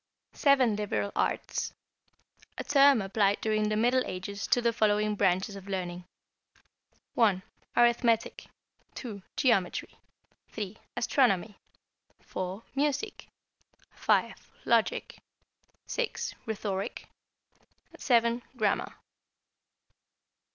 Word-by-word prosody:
=Seven 265 -6 +4
Liberal 205 -1 -2
Arts.= - - -1 0.8
A - - -3
term 275 -5 +5
applied 200 +1 +1
during 215 -1 +1
the 215 - 0
Middle 245 +4 +3
Ages 195 +2 -5
to - - +3
the 235 -1 +1
following 210 -1 +2
branches 190 0 +1
of 195 0 -10
learning: 180 -2 -4 1.1
(1) 200 -6 +3 0.3
Arithmetic, 235 -1 +2 0.5
(2) 215 -6 -7 0.2
Geometry, 225 -10 +1 0.5
(3) 205 -1 -5 0.2
Astronomy, 220 -6 +2 0.6
(4) 185 +4 -5
Music, 295 +9 -1 0.6
(5) - - 0 0.2
Logic, - - +1 0.7
(6) - - -3
Rhetoric, 200 -3 -3 0.9
(7) 235 -1 +2 0.2
Grammar. 210 -3 0
215 Hz, 90 wpm, -29 LUFS, 195-240 Hz, 1.1 s, term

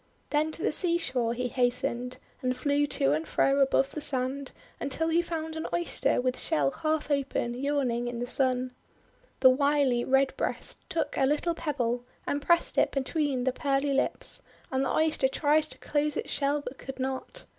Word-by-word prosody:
Then 305 +1 +1
to 330 - -3
the - - +2
seashore 305 -10 +1
he 250 +1 -1
hastened, 250 0 -1 0.2
and 255 0 -1
flew 290 0 +1
to 135 - +2
and 155 +2 -1
fro 275 +1 +2
above 270 0 +3
the 305 - -5
sand, 265 0 -1 0.3
until 320 +4 -1
he 330 +1 +3
found 320 -2 -4
an 320 - -3
Oyster 345 0 +1
with 255 0 -1
shell 140 -2 +1
half 310 - -2
open, 275 -4 0
yawning 255 -2 -1
in 240 0 -4
the 240 - -2
Sun. 255 0 +2 0.7
The 260 - +8
wily 280 -2 +2
Redbreast 270 +1 0
took 330 - -2
a 270 - +4
little 300 +4 +1
pebble, 245 -7 -2 0.2
and 285 - -1
pressed 340 +3 +3
it - - +3
between 275 -1 -1
the 260 0 +1
pearly 275 +1 0
lips, 270 - +1 0.3
and 265 0 +1
the - - 0
Oyster 315 -4 +2
tried 300 +3 +2
to - - -7
close 300 0 -1
its - - -4
shell, 285 +1 +1
but 275 - -8
could 270 - -7
not. 265 - -4
275 Hz, 175 wpm, -28 LUFS, 255-300 Hz, 0.7 s, The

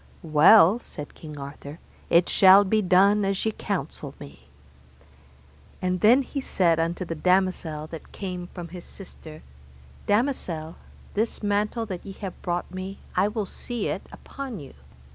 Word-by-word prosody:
Well, 170 +6 +6
said 150 -10 -9
King 150 -2 -10
Arthur, 140 +1 -8 0.3
it 170 +1 +4
shall 195 +1 +7
be 215 +3 +2
done 200 +2 +4
as 195 +1 -1
ye 220 - +2
counsel - - -5
me. 65 -2 -13 1.3
And 180 -1 -1
then 245 +6 +6
he 275 +2 -5
said 170 -9 +2
unto 170 +3 -1
the 165 - -4
damosel 180 -2 0
that 165 - -9
came 180 -3 -6
from 175 -2 -9
his 175 0 -9
sister, 160 -5 -12 0.6
Damosel, 190 - -1 0.4
this 220 +1 -2
mantle 210 +3 0
that 185 -5 -6
ye 195 - -8
have 190 -2 -8
brought 175 0 -3
me, 190 +1 -6 0.2
I 185 +2 +3
will 210 0 -2
see 235 +3 -4
it - - -3
upon 265 -7 -8
you. 140 -3 -11
185 Hz, 150 wpm, -25 LUFS, 165-205 Hz, 1.3 s, shall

